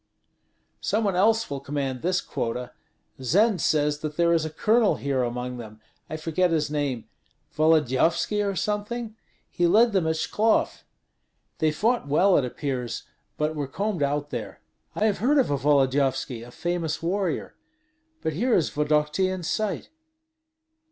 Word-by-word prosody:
"Some 220 +2 0
one 200 -3 0
else 225 +4 +3
will 140 -1 -4
command 135 -2 -3
this 185 +1 +1
quota. 120 +2 -4 0.5
Zend 195 - +3
says 150 -1 +1
that 150 0 -5
there 170 0 +3
is 165 -2 +2
a - - -3
colonel 215 +7 +2
here 140 -2 -1
among 125 +1 -3
them 110 -2 -10 0.3
I 155 - -4
forget 165 +3 +1
his 155 -3 0
name 140 -6 -2 0.5
Volodyovski 160 - +2
or 200 -1 -1
something? 215 +3 -3 0.4
He 175 - +2
led 225 +6 +5
them 185 -5 +2
at 160 - +1
Shklov. 215 +7 +1 0.8
They 155 -1 +2
fought 225 +3 0
well, 180 +7 +4
it 140 - +3
appears, 125 -2 -4 0.3
but 150 +1 0
were 145 -3 -3
combed 200 +4 -2
out 145 +1 -1
there." 120 -3 -5 0.4
"I 215 - +1
have 210 -2 +1
heard 275 +7 +3
of 260 - +3
a - - +2
Volodyovski, 135 -3 +1
a 120 - -10
famous 165 +2 -3
warrior 185 -1 -1 0.7
But 160 - -1
here 235 - +1
is 165 - +1
Vodokty 150 +4 +1
in 185 -1 -4
sight." 215 +4 -2
155 Hz, 155 wpm, -25 LUFS, 140-200 Hz, 0.8 s, led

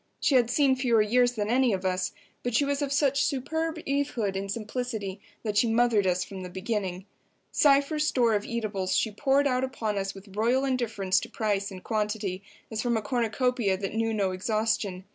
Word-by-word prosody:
She - - +2
had 245 -3 +4
seen 270 +1 +3
fewer 240 -4 +3
years 245 +3 +3
than 215 -2 -2
any 250 -2 +3
of 190 0 -3
us, 185 0 0 0.3
but 245 -2 -2
she 285 - +4
was 285 +1 -1
of 280 -1 -1
such 280 -1 +2
superb 320 +4 -1
Evehood 270 -8 -1
and 195 0 -3
simplicity 215 -3 -4 0.2
that 210 -2 -1
she 235 - +4
mothered 225 -3 +3
us 180 0 +1
from 190 -1 -8
the 180 - -6
beginning. 190 -1 -3 0.5
Cypher's 290 +2 +3
store 235 -3 +3
of 205 -1 +1
eatables 210 -5 -2
she 220 - +1
poured 275 +6 +2
out 255 -2 +1
upon 220 -6 -2
us 195 0 -3
with 195 0 -13
royal 240 +5 +2
indifference 225 -8 +1
to - - -8
price 205 -3 -1
and 185 -2 -10
quantity, 210 -3 -2 0.3
as 220 0 -2
from 235 -1 +1
a - - -1
cornucopia 240 -3 0
that 195 0 -4
knew 225 0 0
no 200 -4 0
exhaustion. 210 -1 -1
225 Hz, 195 wpm, -27 LUFS, 200-255 Hz, 0.5 s, had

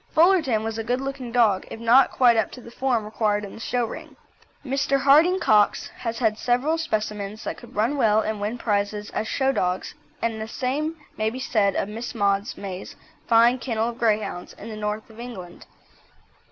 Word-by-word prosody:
Fullerton 315 - +4
was 225 0 -3
a - - -2
good 245 +3 0
looking 270 -2 -5
dog, 225 -6 +3
if - - -8
not 235 +4 +5
quite 245 -2 +4
up 220 - +1
to - - -9
the 235 -1 -12
form 245 -4 0
required 210 -1 0
in 200 - -10
the - - -10
show 245 +1 -1
ring. - - -9 0.5
Mr. 275 0 +1
Harding 315 +7 +5
Cox 210 - +3
has 230 -1 -5
had 220 -3 +1
several 260 +7 +1
specimens 215 -6 -3
that - - -3
could 240 +1 -14
run 225 +7 +1
well 215 -5 +4
and 215 -1 -2
win 215 +4 -2
prizes 205 -2 -1
as 220 - -2
show 265 +2 +1
dogs, 180 -7 -1 0.3
and 225 -1 -2
the 220 - -4
same 280 +7 -2 0.2
may 215 0 +1
be 250 +3 -7
said 215 -6 +1
of - - 0
Miss 225 +3 -6
Maud 200 0 +1
May's 190 -2 -7 0.3
fine 235 +2 +5
kennel 230 -2 -1
of 235 0 -9
Greyhounds 215 -5 -1
in - - -10
the 220 - -6
North 210 0 -3
of 220 - -15
England. 190 -8 -9
225 Hz, 195 wpm, -24 LUFS, 210-255 Hz, 0.5 s, not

